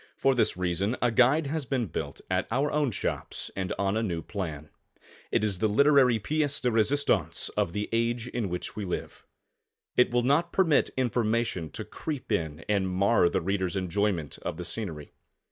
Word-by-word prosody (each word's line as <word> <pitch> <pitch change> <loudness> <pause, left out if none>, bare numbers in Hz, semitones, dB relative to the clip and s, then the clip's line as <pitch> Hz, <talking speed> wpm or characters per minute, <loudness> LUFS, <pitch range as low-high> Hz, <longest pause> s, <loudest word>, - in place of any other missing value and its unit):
For 135 0 +3
this 120 -7 +1
reason 90 +6 0
a 120 - +2
guide 130 +7 +4
has 145 -1 -3
been 130 -4 0
built 85 - -5
at 95 0 0
our 135 +5 +1
own 150 -2 +1
shops 115 - -4
and 95 -1 -3
on 100 +1 0
a 110 - +1
new 85 -7 -2
plan. 80 -7 -5 0.6
It - - +2
is 100 -4 0
the 110 - +2
literary 135 0 +5
piece 145 +5 0
de 125 - +1
resistance 125 +6 +1
of 85 - -1
the 105 +1 -2
age 115 +1 0
in 120 -5 -2
which 90 0 -4
we 105 - -4
live. 90 -2 -5 0.7
It 125 - +5
will 120 0 +1
not 155 +7 +2
permit 165 -6 +3
information 115 -8 0
to - - -5
creep 145 -7 -6
in 80 -5 -2
and 100 -3 +1
mar 95 0 +3
the - - 0
reader's 95 0 -1
enjoyment 95 -4 -1
of - - -5
the - - -5
scenery. 80 -10 -5
110 Hz, 180 wpm, -28 LUFS, 95-130 Hz, 0.7 s, literary